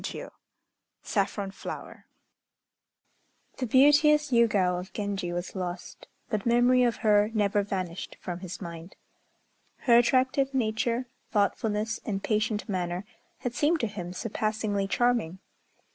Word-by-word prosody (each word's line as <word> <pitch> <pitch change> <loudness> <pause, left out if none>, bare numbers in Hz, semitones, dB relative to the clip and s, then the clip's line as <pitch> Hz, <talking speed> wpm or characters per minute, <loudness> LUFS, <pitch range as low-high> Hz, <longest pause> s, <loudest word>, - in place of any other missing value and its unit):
] - - -13
CHAPTER - - -5
VI - - -14 0.7
SAFFRON 200 -2 -1
FLOWER - - -8 1.5
The 255 - -2
beauteous 295 +4 +5
Yûgao 205 -7 +3
of 185 +3 -9
Genji 200 -4 -3
was 175 +3 -4
lost, 180 -1 -6 0.2
but 210 -2 -2
memory 245 +2 +4
of 240 -2 +3
her 210 0 +5
never 205 -1 +2
vanished 190 -3 -4
from 175 -1 -5
his 185 -1 -7
mind. 170 -1 -8 0.9
Her 235 -2 +6
attractive 260 +2 +2
nature, 235 +1 0 0.2
thoughtfulness, 210 +1 0
and 195 -3 -3
patient 215 0 0
manner 180 -1 -2 0.4
had 245 - -3
seemed 310 +6 +2
to - - +1
him 185 -4 -6
surpassingly 215 0 -2
charming. 235 -6 +1
210 Hz, 130 wpm, -28 LUFS, 190-240 Hz, 1.5 s, Her